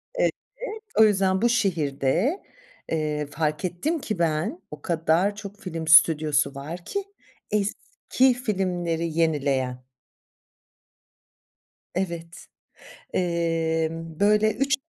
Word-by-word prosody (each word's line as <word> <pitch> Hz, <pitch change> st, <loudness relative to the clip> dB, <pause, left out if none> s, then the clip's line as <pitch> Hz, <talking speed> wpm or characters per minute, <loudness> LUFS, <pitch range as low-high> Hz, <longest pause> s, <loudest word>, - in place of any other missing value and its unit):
Evet, -, -, +2 dB, 0.7 s
o -, -, +9 dB
yüzden 190 Hz, -2 st, +3 dB
bu 240 Hz, -, +4 dB
şehirde, 185 Hz, -, +1 dB, 0.5 s
eee, 150 Hz, -2 st, -1 dB
fark 150 Hz, +3 st, -2 dB
ettim 285 Hz, -, -1 dB
ki 215 Hz, -9 st, -4 dB
ben, 170 Hz, -, 0 dB
o 150 Hz, -, -9 dB
kadar 170 Hz, +4 st, +1 dB
çok 205 Hz, 0 st, -9 dB
film 165 Hz, -5 st, -5 dB
stüdyosu 155 Hz, -3 st, +5 dB
var 160 Hz, +6 st, -7 dB
ki, 400 Hz, 0 st, -3 dB, 0.5 s
eski 250 Hz, -, +1 dB
filmleri 180 Hz, -8 st, -1 dB
yenileyen. 135 Hz, -5 st, 0 dB, 2.1 s
Evet, 170 Hz, -2 st, -4 dB, 0.7 s
emm, 165 Hz, -2 st, -1 dB
böyle 210 Hz, +1 st, +4 dB
3 275 Hz, +1 st, +1 dB
170 Hz, 95 wpm, -25 LUFS, 160-205 Hz, 2.1 s, o